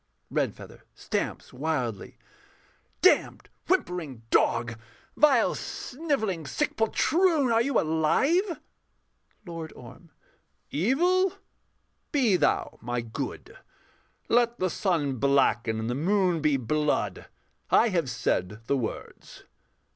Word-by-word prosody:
REDFEATHER - - -3
[stamps - - -4
wildly]. 125 -7 -3 0.9
Damned, - - +3 0.2
whimpering 155 -10 -1
dog! 115 -1 +2 0.4
vile, 275 -6 +4
snivelling, 245 - -3
sick 295 - -1
poltroon! 305 - +2
Are 225 0 +4
you 275 0 +2
alive? 270 - +1 0.9
LORD 165 -3 -7
ORM. 125 +8 -14 0.6
Evil, 350 - +2 0.8
be 250 -9 +3
thou 180 - 0
my 120 +1 -2
good; 115 -1 -6 0.7
Let 235 0 +2
the 185 -1 0
sun 155 -8 0
blacken 120 -4 +2
and 110 - -3
the 120 - -1
moon 180 +3 +1
be 150 -2 +2
blood: 150 +5 -1 0.4
I 235 - +5
have 170 -9 0
said 115 -2 -2
the 140 - +1
words. 115 -4 -7
165 Hz, 100 wpm, -27 LUFS, -, 0.9 s, I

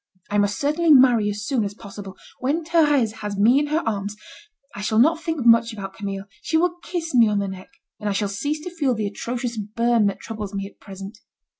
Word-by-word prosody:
I 205 - +2
must 205 0 +1
certainly 305 +4 +1
marry 250 -7 +6
as 205 0 -4
soon 255 -3 0
as 205 0 -4
possible. 200 -3 -10 0.2
When 290 +6 0
Thérèse 295 -9 +2
has 205 -1 -4
me 235 +7 +5
in 295 - -1
her 310 +3 0
arms, 205 -1 -2 0.6
I 205 - -7
shall 215 +1 0
not 320 +8 +4
think 320 -6 -3
much 230 0 +5
about 200 -3 -7
Camille. 195 -2 -5 0.2
She 320 - 0
will 350 +1 +1
kiss 335 -3 -4
me 235 -3 +6
on 210 -1 +1
the 200 0 0
neck, 190 -1 -8 0.3
and 210 -1 -2
I - - 0
shall 205 +1 0
cease 285 +10 -3
to 360 - -6
feel 280 -7 +1
the 215 -1 -2
atrocious 235 +3 -4
burn 225 +1 +1
that 195 -1 -3
troubles 215 -3 -6
me 195 0 -3
at 200 - -13
present. 195 +2 -10
225 Hz, 225 wpm, -23 LUFS, 205-285 Hz, 0.6 s, marry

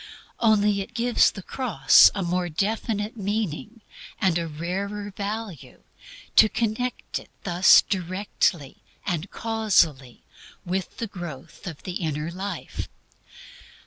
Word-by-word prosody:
Only 210 -3 +3
it 235 +5 -9
gives 240 +1 +3
to - - -1
the 195 - -6
cross 195 - +5
a 195 - -1
more 175 0 -1
definite 210 +5 -2
meaning, 210 +1 -3 0.4
and 180 -3 +2
a 170 - -3
rarer 195 +6 -4
value, 205 - -6 0.5
to 220 - +8
connect 235 +3 -2
it - - -16
thus 180 0 +6
directly 185 -5 -1 0.3
and 175 -1 -2
casually 185 - +1 0.4
with 185 +1 -3
the 230 - -2
growth 175 -7 -9
of 165 -5 -8
the 180 -1 -4
inner 155 -1 -3
life. 190 0 -5
195 Hz, 120 wpm, -25 LUFS, 170-215 Hz, 0.5 s, to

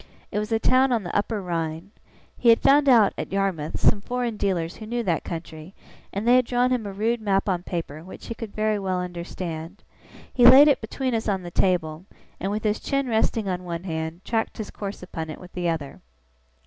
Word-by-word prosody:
It - - -1
was 210 +2 -4
a 225 - +3
town 255 +3 +3
on 230 -4 +1
the 175 - -6
Upper 205 0 -1
Rhine. 165 +1 -3 0.4
He 240 - +2
had 230 - +7
found 280 +1 +5
out, 225 -6 +6
at - - -5
Yarmouth, 190 -6 -1
some 205 - +3
foreign 245 0 -2
dealers 180 -5 -1
who 215 - -9
knew 240 +1 -2
that 170 -6 0
country, 165 +1 -8 0.4
and 205 +4 -3
they 245 +1 +7
had 255 - +3
drawn 245 +1 +2
him 240 -5 0
a - - -5
rude 220 +4 -1
map 195 -2 +1
on 180 -3 0
paper, 165 -4 -5
which 185 - -11
he - - -4
could 225 -2 -7
very 215 -1 +1
well 185 -2 -1
understand. 175 0 -6 0.5
He 245 - +2
laid 260 +4 +10
it 290 - +3
between 255 +3 -3
us 225 -1 -1
on 190 -2 -1
the 175 - -7
table; 170 -2 0 0.3
and, 195 +2 -2
with 210 +1 -3
his 215 0 0
chin 275 -1 -1
resting 220 -2 +1
on 180 -1 -2
one 170 -1 -5
hand, 160 0 -5
tracked 225 -1 -1
his 215 - -6
course 200 -2 -6
upon 160 -3 -6
it 155 - -7
with 180 - -13
the 175 -1 -1
other. 155 -4 -4
200 Hz, 220 wpm, -24 LUFS, 175-230 Hz, 0.5 s, laid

